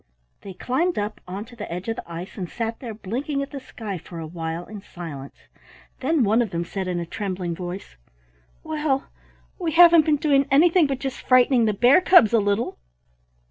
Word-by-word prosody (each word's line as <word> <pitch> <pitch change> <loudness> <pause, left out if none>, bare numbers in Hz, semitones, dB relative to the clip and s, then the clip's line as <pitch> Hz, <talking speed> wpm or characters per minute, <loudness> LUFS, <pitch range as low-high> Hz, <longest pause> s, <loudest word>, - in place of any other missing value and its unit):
They 190 -2 -9
climbed 330 - -1
up 210 +1 -3
onto 205 +6 -7
the 210 -6 -7
edge 180 +4 -5
of 225 - -1
the 170 - -9
ice 170 +3 -7
and 180 -4 -5
sat 230 -1 -4
there 230 -4 -7
blinking 265 +8 -3
at 275 - -9
the 280 - -6
sky 215 -7 -7
for 170 +2 -11
a 165 - -5
while 165 +1 -5
in 210 -2 -9
silence; 160 -8 -10 0.5
then 290 +1 +1
one 220 +3 +3
of 230 - -1
them 170 -1 -3
said 190 +1 -4
in 180 -1 -2
a 170 - -3
trembling 185 -2 -4
voice, 175 - -7 0.7
"Well, 300 -3 -2 0.5
we 335 -4 -2
haven't 335 -2 +7
been 305 -1 +3
doing 280 -2 +2
anything 320 +3 +5
but 270 -1 -2
just 270 0 -5
frightening 255 -1 +4
the 215 - +1
bear 245 - +5
cubs 305 - +6
a 230 - +5
little." 205 - -1
225 Hz, 195 wpm, -23 LUFS, 180-275 Hz, 0.7 s, haven't